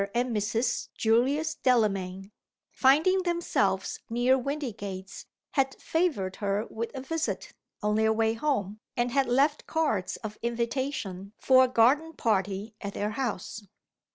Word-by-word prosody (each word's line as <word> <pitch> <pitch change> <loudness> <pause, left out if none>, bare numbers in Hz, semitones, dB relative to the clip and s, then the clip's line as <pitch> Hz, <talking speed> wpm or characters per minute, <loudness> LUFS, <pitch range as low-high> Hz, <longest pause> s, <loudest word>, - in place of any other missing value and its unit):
and 240 -1 0
Mrs. 220 +4 0
Julius 270 +8 +2
Delamayn, 195 -5 0 0.4
finding 315 +8 +4
themselves 345 -1 0
near 245 +3 +3
Windygates, 225 -9 -5 0.2
had 270 -2 +1
favored 290 - -1
her 205 +1 -1
with 230 +1 -3
a 265 - -4
visit, 320 +4 -3 0.3
on 210 0 +2
their 220 0 +3
way 220 0 +2
home, 220 -6 -1 0.2
and 240 0 +1
had 275 0 +2
left 280 +5 +2
cards 290 - 0
of 215 -1 -6
invitation 235 -5 -3
for 260 -1 +5
a 250 - -5
garden 285 +8 +3
party 205 - -1
at 200 -1 -5
their 210 +1 -1
house. 220 -3 -3
235 Hz, 130 wpm, -28 LUFS, 210-275 Hz, 0.4 s, for